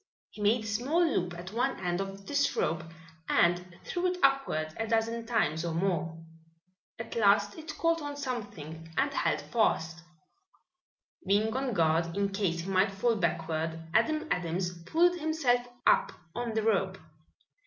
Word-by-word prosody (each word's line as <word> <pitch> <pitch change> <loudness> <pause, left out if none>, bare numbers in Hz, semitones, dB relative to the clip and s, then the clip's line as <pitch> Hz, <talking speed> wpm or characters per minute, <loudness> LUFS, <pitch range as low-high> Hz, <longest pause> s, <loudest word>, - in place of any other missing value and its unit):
He 210 - -10
made 215 +3 +3
a - - -6
small 265 +11 +2
loop 180 - 0
at 180 +3 -8
one 240 +2 0
end 175 +1 -1
of 195 0 -7
this 285 +3 +1
rope 165 0 0 0.5
and 175 0 +2
threw 360 0 -1
it 360 0 -1
upward 270 - +2
a 225 - -2
dozen 230 +1 0
times 160 -9 +1
or 170 -2 -2
more. 170 -2 -1 0.8
At 225 0 -7
last 205 -2 +4
it 315 -1 -8
caught 330 0 +2
on 290 -1 -5
something 200 - -6
and 280 +1 +2
held - - +1
fast. 165 -8 0 1.3
Being 215 +4 +2
on 265 -2 -1
guard, 165 0 +1
in 200 0 +1
case 195 -4 -1
he 180 - -6
might 190 +2 +4
fall 210 +4 +1
backward, 165 -3 -1
Adam 310 +8 +2
Adams 180 +1 -1
pulled 350 - +3
himself 280 -6 +1 0.2
up - - +4 0.2
on 235 -2 -3
the 220 - +1
rope. 195 -3 +1
205 Hz, 155 wpm, -30 LUFS, 175-245 Hz, 1.3 s, last